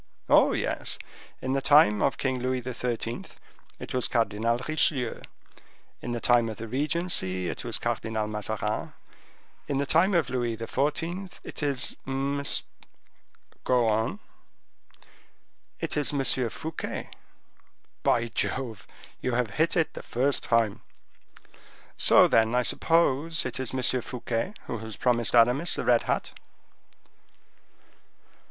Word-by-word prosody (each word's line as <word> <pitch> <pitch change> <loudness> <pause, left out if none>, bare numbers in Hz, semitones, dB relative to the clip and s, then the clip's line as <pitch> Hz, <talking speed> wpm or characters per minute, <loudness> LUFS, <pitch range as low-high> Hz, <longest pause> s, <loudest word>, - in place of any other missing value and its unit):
"Oh, - - +5
yes; - - -2 0.5
in 130 +1 -1
the 135 - +1
time 140 -7 +5
of 135 - +1
King 130 -2 -1
Louis 130 0 -1
XIII. 120 -1 -3 0.6
it - - -7
was 125 -1 +1
Cardinal 115 +1 0
Richelieu; 140 -6 +1 0.8
in 120 - -5
the 120 - -2
time 120 -1 +3
of 110 - -7
the 115 - -6
regency 130 - 0
it - - -5
was - - -3
Cardinal 110 -1 -2
Mazarin. 105 0 -3 0.7
In 140 - -1
the 140 - 0
time 175 +7 +3
of 170 -6 +1
Louis 120 -3 -1
XIV. 160 - -2
it - - -7
is 140 -3 -1
M—" 140 +1 -1 1.2
"Go 125 -2 +2
on." 110 +1 0 1.6
"It - - -2
is 150 -2 0
M. 135 -3 +1
Fouquet." 160 +7 -6 1.2
"Jove! 120 -4 -3 0.3
you 130 - -1
have 120 -2 0
hit 160 - +1
it 165 - +1
the - - -7
first 135 +4 0
time." 115 -3 +1 1.1
"So, - - +7
then, 115 +1 +3
I 125 - +3
suppose 165 +2 +2
it 130 - -3
is 130 - -2
M. 130 -1 +2
Fouquet 125 - -3
who - - -4
has 110 -1 -8
promised 120 -2 +1
Aramis 125 +8 +4
the - - -3
red 120 -1 +4
hat." - - -1
125 Hz, 130 wpm, -27 LUFS, 115-140 Hz, 1.6 s, So